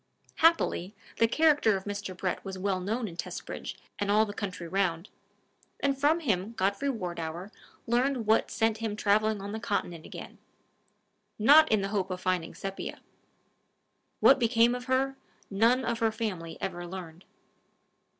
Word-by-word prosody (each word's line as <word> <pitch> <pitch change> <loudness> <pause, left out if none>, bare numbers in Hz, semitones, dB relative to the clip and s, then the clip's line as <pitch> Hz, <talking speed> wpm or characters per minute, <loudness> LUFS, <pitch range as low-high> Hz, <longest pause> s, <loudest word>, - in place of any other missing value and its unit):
Happily, 315 - +2 0.2
the 230 - +5
character 290 -6 +3
of 190 - -8
Mr. 200 -2 -5
Brett 185 -1 -2
was 195 -1 -6
well 190 0 -1
known 220 +5 -2
in 170 - -9
Testbridge - - -6 0.2
and 205 - -1
all 215 +2 +4
the 205 - -6
country 185 -4 -5
round; 180 -1 -1 0.7
and 280 -1 +1
from 295 +5 +2
him 215 - -1
Godfrey 200 +6 0
Wardour 175 -4 -4 0.3
learned 245 +1 +1
what 220 +1 +3
sent 225 -1 +1
him 220 -2 -2
traveling 215 0 +2
on 200 - -5
the 220 - -4
Continent 175 -7 -3
again - - -10 1.0
not 290 +8 +7
in 215 -2 +3
the 195 - -2
hope 195 -2 -1
of 185 -1 -4
finding 185 -3 -1
Sepia. 195 0 -6 1.2
What 270 - +7
became 235 0 +4
of 250 0 -5
her, 270 +1 0 0.3
none 230 +6 +3
of 235 -1 -1
her 225 -1 +2
family 195 -7 -4
ever 175 -2 -4
learned. 175 -1 -8
205 Hz, 155 wpm, -29 LUFS, 185-235 Hz, 1.2 s, not